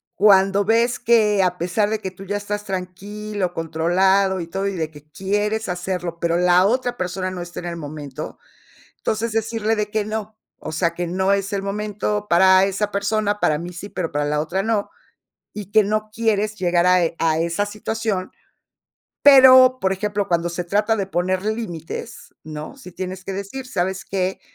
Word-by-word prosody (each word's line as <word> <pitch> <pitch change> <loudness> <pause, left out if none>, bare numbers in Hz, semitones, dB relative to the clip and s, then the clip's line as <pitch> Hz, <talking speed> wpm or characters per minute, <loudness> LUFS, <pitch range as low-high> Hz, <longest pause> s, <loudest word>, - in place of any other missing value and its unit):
cuando 195 0 +4
ves 230 +3 +2
que 220 -4 +3
a 180 -1 0
pesar 180 +5 0
de 220 - -1
que 190 - -4
tú 190 +1 -12
ya 205 +2 -2
estás 205 0 -4
tranquilo, 195 +1 -4
controlado 185 +4 +2
y 170 - -5
todo, 195 +3 -2
y 200 - -2
de 160 -3 -2
que 150 -1 -16
quieres 205 +3 -1
hacerlo, 180 -1 -3
pero, 170 0 +1
la 180 +1 +4
otra 245 +3 0
persona 185 +1 -3
no 185 -1 -6
está 175 0 -7
en 175 - -6
el 170 -1 -5
momento, 145 -3 -7 0.6
entonces 220 +1 -2
decirle 225 0 0
de 210 -1 -2
que 215 0 0
no. 215 0 -4 0.2
O 155 - -7
sea, 170 +1 0
que 175 +1 -3
no 190 +3 +1
es 200 0 -2
el 200 -1 -1
momento 210 +1 -2
para 190 +2 +6
esa 200 +2 -1
persona, 205 +1 0
para 150 -6 +2
mí 175 +2 -7
sí, 200 +4 -8
pero, 170 -3 -3
para 145 0 0
la 150 0 0
otra 175 +5 -1
no, 215 -1 0 0.7
y 205 -2 -8
que 215 0 +5
no 215 +1 -1
quieres 215 -2 0
llegar 175 -2 +1
a 180 -1 +5
e 165 - -1
a 160 -1 +2
esa 170 +5 0
situación. 210 -2 -3 0.9
Pero, 260 -2 +8
por 190 0 +1
ejemplo, 205 +1 -2
cuando 170 0 +1
se 175 +1 -3
trata 210 +5 +1
de 195 -3 -2
poner 185 +1 -1
límites, 215 -1 -5
¿no? 155 - -7
Si 215 -10 -12
tienes 185 +1 -6
que 195 - -4
decir: 200 +7 -6
"¿Sabes 190 -4 -2
qué? 190 -1 -2
195 Hz, 190 wpm, -21 LUFS, 175-210 Hz, 0.9 s, Pero